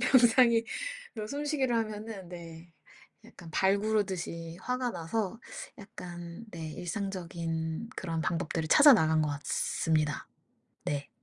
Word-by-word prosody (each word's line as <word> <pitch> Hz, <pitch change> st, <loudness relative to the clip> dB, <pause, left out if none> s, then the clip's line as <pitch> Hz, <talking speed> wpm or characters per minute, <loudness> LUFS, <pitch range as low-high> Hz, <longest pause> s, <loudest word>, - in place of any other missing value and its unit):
명상이 235 Hz, -2 st, +6 dB, 0.5 s
그런 215 Hz, -2 st, -4 dB
숨쉬기를 285 Hz, -4 st, 0 dB
하면은 215 Hz, -4 st, -3 dB
네 170 Hz, -1 st, -10 dB, 0.5 s
약간 180 Hz, -7 st, -12 dB
발 195 Hz, +4 st, +4 dB
구르듯이 185 Hz, -6 st, -1 dB
화가 250 Hz, 0 st, -1 dB
나서 205 Hz, +4 st, -2 dB, 0.4 s
약간 175 Hz, -1 st, -8 dB
네 160 Hz, -4 st, -6 dB
일상적인 170 Hz, -1 st, -3 dB
그런 165 Hz, -3 st, -2 dB
방법들을 165 Hz, -1 st, -1 dB
찾아 290 Hz, -, +9 dB
나간 160 Hz, -8 st, +4 dB
것 150 Hz, -, +1 dB
같습니다. 150 Hz, +1 st, 0 dB, 0.6 s
네. 145 Hz, -1 st, -2 dB
180 Hz, 250 characters per minute, -30 LUFS, 165-225 Hz, 0.6 s, 찾아